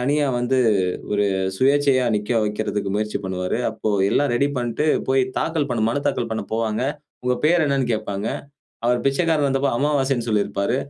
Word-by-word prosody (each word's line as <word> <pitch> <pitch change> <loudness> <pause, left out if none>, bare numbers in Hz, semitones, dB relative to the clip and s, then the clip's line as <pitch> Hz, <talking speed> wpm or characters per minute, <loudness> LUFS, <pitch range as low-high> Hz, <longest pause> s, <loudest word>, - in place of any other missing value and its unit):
தனியா 145 +3 +1
வந்து, 125 +2 +1 0.5
ஒரு 105 0 +2 0.3
சுயேச்சையா 135 0 +3
நிற்க 105 +2 -4
வைக்கிறதற்கு 105 -2 -2
முயற்சி 105 -1 -2
பண்ணுவாரு. 90 +2 -2
அப்போ, 110 - -3 0.2
எல்லாம் 145 +3 +2
ரெடி 140 +4 +2
பண்ணிட்டு, 120 +5 -1 0.2
போய் 130 0 +3 0.2
தாக்கல் 160 -3 -1
பண்ண, 115 -3 0
மனு 140 +5 -1
தாக்கல் 120 -5 -1
பண்ண 110 - -3
போவாங்க. 110 0 -1 0.4
உங்க 125 0 +1
பேரு 175 +1 +4
என்னன்னு 135 -3 0
கேட்பாங்க. 105 -1 -3 0.6
அவர் 120 0 +2
பிச்சைக்காரரா 150 +1 +2
இருந்தபோது 135 -2 +1
"அமாவாசைன்னு" 135 -5 0
சொல்லிருப்பாரு. 105 +1 0
125 Hz, 155 wpm, -22 LUFS, 110-140 Hz, 0.6 s, பேரு